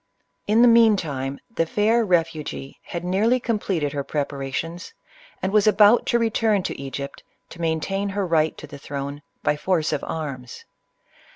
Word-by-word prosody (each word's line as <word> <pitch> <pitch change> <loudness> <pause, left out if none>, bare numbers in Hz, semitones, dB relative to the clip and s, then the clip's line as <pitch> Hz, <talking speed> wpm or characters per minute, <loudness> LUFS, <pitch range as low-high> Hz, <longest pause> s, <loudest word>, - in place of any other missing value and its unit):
In 220 +3 +5
the - - +8
mean 230 -3 +6
time, 140 -5 -4 0.2
the 165 - +1
fair 220 +6 +2
refugee 165 -7 -1
had 170 0 -5
nearly 210 +8 +2
com 230 -3 -1
pleted 160 -8 -1
her 140 -1 -2
preparations, 145 - -4 0.5
and 190 +1 -1
was 210 0 +4
about 210 +2 +5
to 235 - +3
return 225 -3 +1
to - - -4
Egypt 140 +1 -6 0.3
to 170 - -10
maintain 170 +5 -1
her 200 0 -1
right 160 -2 +1
to - - -9
the 140 -1 -11
throne 140 +1 -5 0.2
by - - +2
force 160 +1 0
of - - -2
arms. 135 -6 -6
170 Hz, 165 wpm, -23 LUFS, 145-210 Hz, 0.5 s, the